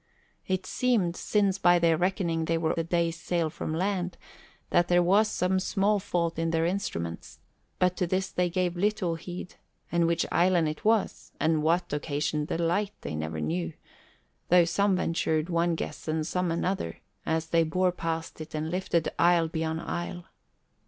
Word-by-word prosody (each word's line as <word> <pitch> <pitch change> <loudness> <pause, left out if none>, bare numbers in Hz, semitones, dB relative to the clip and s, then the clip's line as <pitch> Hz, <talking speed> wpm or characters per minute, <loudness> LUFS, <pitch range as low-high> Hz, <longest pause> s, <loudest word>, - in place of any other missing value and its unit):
It 185 0 -1
seemed, 215 -10 +1
since 200 -1 +1
by 175 -2 +5
their 170 -1 +3
reckoning 170 -2 0
they 165 0 +1
were 160 -1 0
still 165 - 0
a - - -5
day's 170 -1 0
sail 170 -3 0
from - - -5
land, 180 0 -1 0.5
that 175 0 +4
there 175 0 +4
was 200 +5 +4
some 190 -2 +1
small 200 +2 +1
fault 170 -4 -1
in 165 0 0
their 165 0 +1
instruments; 85 - -3 0.4
but 180 0 +2
to 180 - 0
this 190 +2 -1
they 180 0 +1
gave 180 0 0
little 195 -2 0
heed, 175 +2 -7 0.4
and 170 -1 +3
which 170 0 +1
island 175 -2 +3
it 155 0 -5
was 220 -1 0
and 155 0 +2
what 165 +1 +1
occasioned 150 0 -1
the - - -2
light 185 +5 0
they - - -5
never 80 0 -3
knew, 80 +1 -2 0.8
though 175 -1 +6
some 195 +3 +2
ventured 165 -2 0
one 170 0 +2
guess - - -6
and 155 0 0
some 180 +2 -1
another 170 - -2 0.2
as 160 0 -1
they 165 0 +4
bore 180 +3 +1
past 165 -2 -4
it 155 - -8
and 155 +1 -2
lifted 180 -3 0
isle 170 -1 +4
beyond 160 0 -2
isle. 175 0 -4
170 Hz, 175 wpm, -28 LUFS, 160-185 Hz, 0.8 s, though